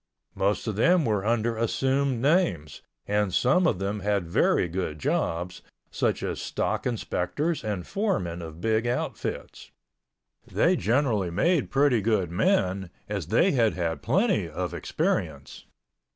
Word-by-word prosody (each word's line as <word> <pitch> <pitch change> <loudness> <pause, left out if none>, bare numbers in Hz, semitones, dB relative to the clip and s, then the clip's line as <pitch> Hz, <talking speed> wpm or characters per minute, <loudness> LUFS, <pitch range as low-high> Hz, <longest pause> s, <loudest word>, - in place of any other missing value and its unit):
Most 100 +2 0
of 110 -3 -3
them 170 +6 +4
were 105 -4 0
under 115 +1 0
assumed 130 +2 0
names, 135 - +1 0.2
and 105 -1 0
some 135 - +3
of 90 - +1
them 100 +3 -2
had 100 -3 -1
very 85 - +2
good 85 -3 -3
jobs, 85 +4 -2 0.3
such - - -1
as - - -3
stock - - -2
inspectors 125 - -2
and 100 -5 -3
foremen 95 - -2
of 80 -1 -9
big 110 +3 +1
outfits. 120 +1 -4 0.8
They - - +3
generally 110 -4 +1
made 150 - +1
pretty 135 -4 +3
good 100 -5 0
men, 95 - +1 0.2
as 100 -7 -4
they 185 - +3
had 115 -6 +2
had 85 -2 -2
plenty - - +1
of - - -4
experience. - - -3
105 Hz, 135 wpm, -26 LUFS, 90-130 Hz, 0.8 s, them